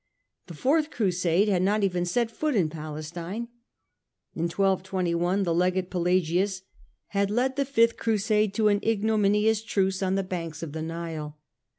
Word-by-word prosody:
The 170 - -9
Fourth 300 - +2
Crusade 185 - +1
had 190 -4 +2
not 205 +3 +2
even 180 -2 +1
set 230 +6 0
foot 300 +3 -1
in 175 -7 +2
Palestine. 165 +8 -6 0.8
In 165 - -2
1221 185 -1 0
the 170 -3 0
Legate 180 +1 0
Pelagius 180 +2 +1 0.5
had 200 -1 0
led 250 +5 0
the 280 0 0
Fifth 230 -4 +3
Crusade 215 -2 +1
to 215 -2 +3
an 205 0 +2
ignominious 215 0 +2
truce 195 -3 0
on 190 0 +1
the 195 - 0
banks 165 -4 -5
of 160 - -5
the 160 +1 -5
Nile. 160 -2 -5
190 Hz, 155 wpm, -26 LUFS, 170-215 Hz, 0.8 s, Fifth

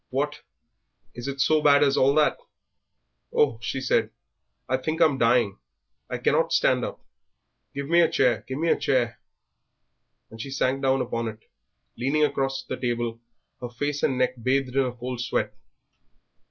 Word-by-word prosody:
"What! - - -2 0.7
is 120 +2 -7
it 140 0 -5
so 155 +3 +3
bad 145 -1 +5
as 140 -1 +3
all 135 +2 +3
that?" 155 -1 +3 0.9
"Oh," 135 -7 +2
she 130 +3 -3
said, 130 - +1 0.6
"I 130 - +1
think 155 +5 -3
I'm 145 -5 +3
dying, 115 - +2 0.5
I - - -3
cannot - - +1
stand - - +3
up; - - -6 0.7
give 140 0 -4
me 170 +2 +5
a 165 - +4
chair, 120 -5 +2
give 130 - -4
me 165 +2 0
a - - +5
chair!" 120 -3 0 1.1
and 110 0 -8
she 135 - -6
sank 135 0 0
down 135 -1 +2
upon 115 -2 -2
it, 110 0 -8 0.5
leaning 140 +6 +1
across 135 -2 0
the - - -5
table, 120 -2 -2 0.4
her 125 - -5
face 145 +4 -3
and 130 - +1
neck 125 -1 0
bathed 130 +1 0
in 135 -1 +3
a 125 - -2
cold 125 0 -5
sweat. 110 -4 -1
130 Hz, 165 wpm, -25 LUFS, 120-140 Hz, 1.1 s, bad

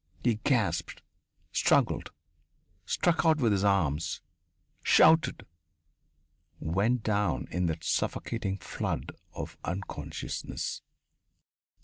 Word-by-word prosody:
He 115 -3 +2
gasped, 120 -7 0 0.5
struggled, - - +2 0.8
struck 175 -1 +2
out 160 -2 +4
with 120 -7 +2
his 100 -1 +1
arms, 85 -6 +1 0.6
shouted, 160 0 +5 1.1
went 105 +9 +1
down 105 -1 0
in 90 +1 0
that 80 -1 -3
suffocating 100 +1 -1
flood - - -3 0.2
of - - -7
unconsciousness.... 90 +3 -4
100 Hz, 85 wpm, -29 LUFS, 90-120 Hz, 1.1 s, shouted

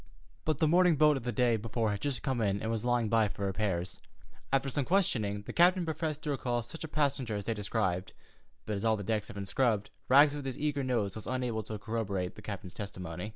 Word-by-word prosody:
But 155 -3 +1
the 155 - +3
morning 175 +1 +5
boat 150 0 +5
of 130 -3 -5
the 120 - 0
day 120 0 +2
before 110 0 -1
had 100 0 -3
just 140 -3 -2
come 130 -4 0
in 100 -2 +1
and 110 - -2
was 115 -1 -2
lying 120 -2 +2
by 110 0 +3
for 100 0 -4
repairs. 95 -3 -2 0.5
After 135 0 +2
some 135 +1 0
questioning, 115 - +1
the - - -7
captain 180 +1 +5
professed 155 -2 -3
to 150 - -1
recall 120 -3 -1
such 160 +9 -9
a - - -4
passenger 140 -7 0
as 100 -1 -4
they 115 - 0
described, 100 -3 -1 0.5
but 105 - -2
as 100 - -4
all 110 -1 +3
the 100 - -5
decks 105 0 -1
had - - -10
been 100 -1 -4
scrubbed, 105 0 +1 0.2
Rags 140 +3 +7
with 145 -2 -5
his 130 - -4
eager 145 -2 -1
nose 115 -6 0
was 110 - -8
unable 125 -3 -1
to 110 0 -6
corroborate 100 -4 -2
the - - -12
captain's 100 -3 -6
testimony. 90 -2 -6
115 Hz, 235 wpm, -31 LUFS, 105-140 Hz, 0.5 s, Rags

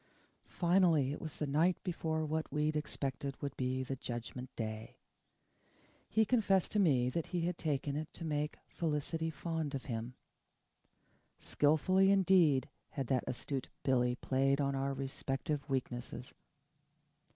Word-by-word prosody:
Finally 170 -6 +3
it 145 - -5
was 155 -2 -5
the 150 - -1
night 160 +6 +3
before 160 -3 -1
what 155 +1 -2
we 150 0 +1
expected 140 -3 -3
would 140 -1 -4
be 130 0 -1
the 135 +1 -3
Judgment 125 +1 -6
Day 110 -1 -5 1.1
he 220 +1 +3
confessed 200 -5 +2
to 210 - +2
me 135 -10 +4
that 165 +3 -2
he 175 -2 -1
had 175 +1 0
taken 145 -3 -1
it 155 +1 -4
to 165 - -7
make 150 -1 -1
Felicity 160 0 -2
fond 160 -1 -3
of 135 - -5
him. 115 +1 -4 1.2
Skilfully 185 +6 +3
indeed 180 -9 +4 0.2
had 135 - -3
that 130 0 0
astute 130 +1 -3
Billy 125 -2 +2
played 135 +2 +1
on 140 -1 +1
our 135 0 -1
respective 135 +2 -3
weaknesses. 125 -1 -3
145 Hz, 140 wpm, -34 LUFS, 130-165 Hz, 1.2 s, me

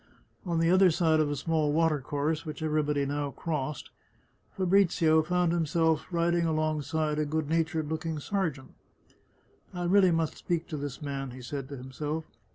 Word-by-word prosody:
On 170 -1 0
the 165 +1 +3
other 185 0 +6
side 160 -1 +2
of 155 -1 +2
a 145 - -1
small 155 +1 0
water 160 -2 +2
course, 150 +4 -1
which 155 0 -6
everybody 150 -2 +1
now 145 +1 -2
crossed, 150 -1 -4 0.7
Fabrizio 175 -4 +4
found 175 +1 +1
himself 160 -1 +1
riding 170 0 +1
alongside 155 -1 0
a - - +2
good 155 0 -2
natured 160 0 0
looking 160 +1 -3
sergeant. 155 -5 -3 0.5
" - - -35
I 175 - -3
really 190 +1 +5
must 165 -2 0
speak 170 -1 -2
to 155 - -4
this 145 0 -6
man," 135 -2 -4
he 125 +1 -9
said 135 +1 -5
to 140 - -6
himself. 150 +5 -4
155 Hz, 165 wpm, -29 LUFS, 145-165 Hz, 0.7 s, other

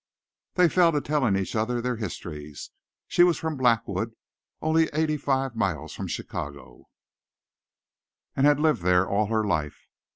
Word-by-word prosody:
They 180 -1 +5
fell 170 0 +4
to 150 - +2
telling 140 -8 +1
each 95 +4 -2
other 115 +3 0
their 125 0 -2
histories. 75 -8 -7 0.4
She - - +2
was 175 -2 +4
from 160 -1 -3
Blackwood, 120 -5 0 0.4
only 160 +1 +2
eighty 155 0 +1
five 135 -3 -1
miles 85 -9 -2
from - - -5
Chicago, 70 -3 -7 1.5
and 135 +2 +4
had 145 -1 +4
lived 150 - +2
there 90 +1 +3
all 105 +1 +1
her 110 0 0
life. 80 -7 -2
120 Hz, 150 wpm, -26 LUFS, 95-150 Hz, 1.5 s, They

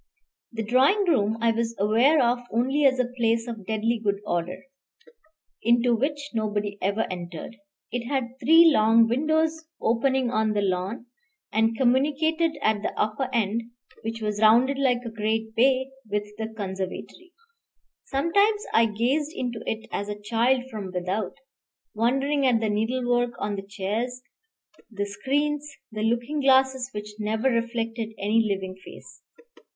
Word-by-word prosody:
The 225 -1 -4
drawing 265 - +3
room 220 -9 +2
I 230 0 +3
was 230 0 -2
aware 230 +10 +4
of 240 +1 +1
only 265 +6 +1
as 265 -1 +4
a 255 - +2
place 230 -1 +1
of 225 -5 -7
deadly 220 +2 0
good 200 -1 0
order, 175 -1 -3 1.0
into 240 +1 +3
which 285 +4 -2
nobody 210 -2 -2
ever 200 +3 0
entered. 175 +4 -7 0.4
It 235 0 -3
had 260 -2 -3
three 325 +6 +7
long 225 0 +5
windows 315 +5 +1 0.2
opening 255 +2 +1
on 220 -2 +1
the 205 -1 0
lawn, 190 +6 -2 0.5
and 225 +1 +2
communicated 300 +6 +2
at 215 -1 +2
the - - -4
upper 215 +5 -1
end, 225 -1 0 0.4
which 225 0 -5
was 210 0 -2
rounded 245 +6 +5
like 250 -3 +1
a 230 - -5
great 220 0 -2
bay, 260 +3 +2 0.2
with 210 0 0 0.2
the 220 - -2
conservatory. 200 - -6 0.7
Sometimes 400 +9 +1
I 230 0 +5
gazed 260 +8 -1
into 240 -3 -3
it 220 0 -3
as 205 +1 -3
a 205 0 -5
child 235 +4 +1
from 205 -4 -5
without, 185 +4 -3 0.6
wondering 270 +5 +1
at 240 -3 +3
the 220 -1 -1
needlework 245 +2 0
on 205 0 -2
the 195 - -4
chairs, 220 +6 -3 0.7
the 205 -3 -3
screens, 290 +7 -1 0.2
the 215 -1 -5
looking 240 +6 0
glasses 265 -2 +3
which 210 0 -8
never 220 +5 0
reflected 230 -1 -2
any 215 +3 +2
living 190 -1 -3
face. - - -13
230 Hz, 145 wpm, -25 LUFS, 215-265 Hz, 1.0 s, three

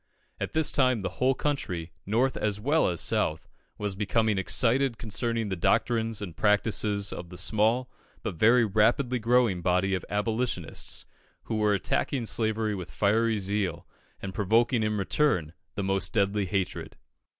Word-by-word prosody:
At - - -4
this 160 -1 +1
time 130 -5 +2
the 95 - -5
whole 130 +1 +3
country, 90 - -3 0.2
North 120 +6 +1
as 105 -1 -1
well 145 +8 +2
as 85 -3 -1
South, - - 0 0.3
was 105 -2 -3
becoming 105 0 +1
excited 125 +5 +2
concerning 115 0 -2
the 95 - -1
doctrines 110 +4 +1
and 90 -5 -7
practices 105 -1 +1
of 85 - -7
the 90 - -10
small 110 +6 +1 0.4
but 110 - -3
very 115 +7 +4
rapidly 120 +5 +2
growing 115 -5 +2
body 90 +2 +1
of 95 - -1
Abolitionists, 105 -5 -2 0.4
who 110 - -3
were 105 -1 +3
attacking 120 +5 -1
slavery 110 -1 0
with 90 -3 -6
fiery 110 +2 +1
zeal, 100 -1 -2 0.3
and 95 -1 -6
provoking 115 +4 +2
in 105 -1 0
return 95 - +1 0.2
the 100 - -2
most 95 -1 0
deadly 100 -1 +1
hatred. 95 0 -3
105 Hz, 150 wpm, -27 LUFS, 95-115 Hz, 0.4 s, very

